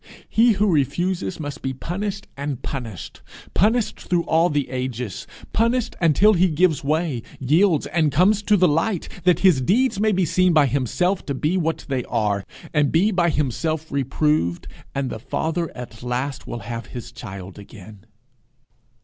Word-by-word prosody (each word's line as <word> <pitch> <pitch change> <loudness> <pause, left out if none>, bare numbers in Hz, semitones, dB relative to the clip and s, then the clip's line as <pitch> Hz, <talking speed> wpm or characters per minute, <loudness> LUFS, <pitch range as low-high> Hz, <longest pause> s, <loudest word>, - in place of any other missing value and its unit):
He 230 +1 +4
who 205 +1 +1
refuses 175 +3 0
must 145 -1 -6
be 135 - -2
punished 195 +8 -4
and 140 -2 -4
punished 115 - -6 0.3
punished 220 +4 +1
through 175 -2 0
all 165 +2 +3
the 145 -3 0
ages 125 -4 -4 0.3
punished 230 +2 +1
until 175 +6 +5
he 185 0 +3
gives 160 -2 +2
way, 155 -3 0 0.2
yields, 155 +5 +3
and 155 +1 +1
comes 195 +8 +3
to 210 0 +3
the 180 -1 +5
light, 165 +5 0 0.2
that 180 -1 +4
his 175 -8 +5
deeds 225 - +2
may 215 +1 +3
be 185 -2 +2
seen 185 +2 +3
by 155 -2 +5
himself 140 - 0
to 140 - -2
be 155 +7 0
what 165 -3 -1
they 130 -3 -1
are, 105 -4 0 0.3
and 150 -2 +2
be 190 +7 +3
by 175 -3 +2
himself 155 +2 -1
reproved, 135 - 0 0.3
and 135 -1 -1
the - - -5
Father 165 +8 -2
at 120 -2 -9
last 125 +2 -3 0.2
have 115 0 -6
his 120 -3 -8
child 95 -1 -9
again. 100 0 -13
155 Hz, 160 wpm, -22 LUFS, 130-185 Hz, 0.3 s, until